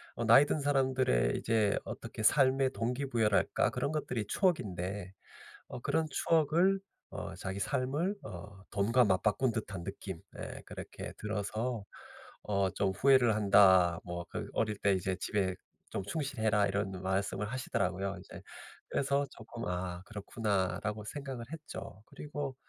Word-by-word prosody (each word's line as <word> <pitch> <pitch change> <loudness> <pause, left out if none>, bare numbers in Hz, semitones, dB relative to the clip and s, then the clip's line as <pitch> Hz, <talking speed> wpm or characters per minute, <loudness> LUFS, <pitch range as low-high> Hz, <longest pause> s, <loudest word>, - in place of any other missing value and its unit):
어 115 - -2
나이 115 +6 +8
든 155 - 0
사람들의 130 - +2
이제 110 -3 +2
어떻게 - - -6
삶의 135 +2 +4
동기부여랄까 120 -3 +1
그런 140 - -1
것들이 125 -8 -2
추억인데 100 - -1 0.6
어 125 - -7
그런 160 +3 +1
추억을 165 +6 +3 0.3
어 - - -6
자기 95 +1 -4
삶을 145 - 0
어 95 +2 -9
돈과 115 +5 +3
맞바꾼 105 +6 +2
듯한 100 -6 -4
느낌 95 -4 -6 0.2
예 - - -7
그렇게 - - -7
들어서 110 +2 -2 0.6
어 100 -2 +1
좀 100 - +2
"후회를 125 +2 +5
한다. 95 -4 +6
뭐 85 0 -5
그 - - -5
어릴 110 -2 0
때 100 -1 +3
이제 95 0 0
집에 95 -3 0 0.4
좀 - - -2
충실해라." 110 -4 +1
이런 100 0 -1
말씀을 95 +2 -1
하시더라고요. 100 -6 -2
이제 - - -11 0.5
그래서 140 +1 +1
쪼끔 115 +1 -8
'아 90 0 -3
그렇구나.'라고 105 -1 -2
생각을 135 -3 -6
했죠. 150 -9 -8
그리고 145 -3 -5
110 Hz, 295 characters per minute, -32 LUFS, 95-130 Hz, 0.6 s, 나이